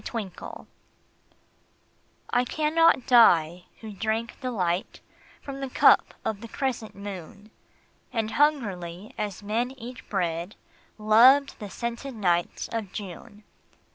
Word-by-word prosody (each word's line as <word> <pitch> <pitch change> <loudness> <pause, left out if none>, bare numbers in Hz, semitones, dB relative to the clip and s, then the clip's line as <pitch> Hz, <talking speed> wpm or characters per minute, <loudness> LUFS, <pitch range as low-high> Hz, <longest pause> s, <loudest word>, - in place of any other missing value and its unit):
The - - -6
Wine 200 -6 -7 1.6
I 245 0 +3
cannot 310 +1 +2
die, 175 -8 +5 0.2
who 220 -2 -8
drank 220 +3 -3
delight 190 -9 -2 0.4
From 275 -1 -7
the 270 -1 -4
cup - - +4
of 210 -2 -2
the 230 - -8
crescent 240 -3 -3
moon, 200 +1 -9 0.6
And 225 -3 -2
hungrily 205 - 0
as 205 -1 -4
men 225 +4 -1
eat 240 0 -9
bread, 175 -1 -2 0.4
Loved 245 +6 +5
the 205 - -7
scented 235 +5 -5
nights 175 -5 0
of 220 -5 -4
June. 205 +1 -9
220 Hz, 115 wpm, -26 LUFS, 190-245 Hz, 1.6 s, die